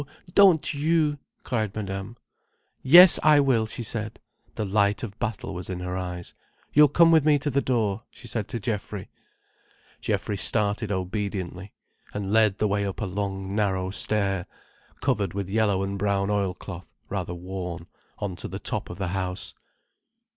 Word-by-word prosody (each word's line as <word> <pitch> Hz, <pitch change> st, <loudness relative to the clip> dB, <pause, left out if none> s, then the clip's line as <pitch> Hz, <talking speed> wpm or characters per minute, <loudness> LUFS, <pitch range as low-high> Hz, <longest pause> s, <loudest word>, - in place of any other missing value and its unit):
Don't 190 Hz, -7 st, +5 dB
you!" 150 Hz, 0 st, +1 dB, 0.2 s
cried 110 Hz, -5 st, -2 dB
Madame. 95 Hz, +2 st, -5 dB, 0.6 s
"Yes 175 Hz, +7 st, +9 dB
I 150 Hz, -1 st, +6 dB
will," 125 Hz, -6 st, +2 dB
she 120 Hz, -, -6 dB
said. 110 Hz, 0 st, -5 dB, 0.4 s
The 110 Hz, -, -2 dB
light 100 Hz, +2 st, +1 dB
of 105 Hz, -2 st, -7 dB
battle 110 Hz, -4 st, -3 dB
was 90 Hz, 0 st, -6 dB
in 90 Hz, -1 st, -4 dB
her 90 Hz, 0 st, -4 dB
eyes. 90 Hz, -1 st, -5 dB, 0.4 s
"You'll 150 Hz, +1 st, +7 dB
come 165 Hz, +4 st, +5 dB
with 160 Hz, -3 st, +5 dB
me 150 Hz, -1 st, +4 dB
to 145 Hz, +1 st, -2 dB
the 140 Hz, +2 st, +2 dB
door," 110 Hz, -6 st, 0 dB
she -, -, -12 dB
said 110 Hz, -4 st, -3 dB
to 120 Hz, -, -4 dB
Geoffrey. 105 Hz, -2 st, -4 dB, 0.9 s
Geoffrey 105 Hz, -, -2 dB
started 105 Hz, +1 st, +1 dB
obediently, 95 Hz, 0 st, -4 dB, 0.4 s
and 100 Hz, 0 st, -3 dB
led 110 Hz, -3 st, +4 dB
the 105 Hz, -, +1 dB
way 100 Hz, 0 st, 0 dB
up 100 Hz, -1 st, -4 dB
a 105 Hz, -, -2 dB
long 95 Hz, 0 st, -4 dB
narrow 95 Hz, -3 st, 0 dB
stair, 100 Hz, -3 st, 0 dB, 0.5 s
covered 100 Hz, -3 st, 0 dB
with 100 Hz, -1 st, -4 dB
yellow 100 Hz, -3 st, +2 dB
and 100 Hz, 0 st, -4 dB
brown 100 Hz, 0 st, 0 dB
oil 100 Hz, -3 st, 0 dB
cloth, 90 Hz, -3 st, -10 dB
rather 90 Hz, -3 st, -4 dB
worn, 90 Hz, -1 st, -6 dB, 0.3 s
on 100 Hz, -3 st, -4 dB
to -, -, -6 dB
the -, -, -6 dB
top -, -, -3 dB
of -, -, -7 dB
the 95 Hz, -3 st, -2 dB
house. 95 Hz, 0 st, -4 dB
100 Hz, 165 wpm, -25 LUFS, 95-115 Hz, 0.9 s, Yes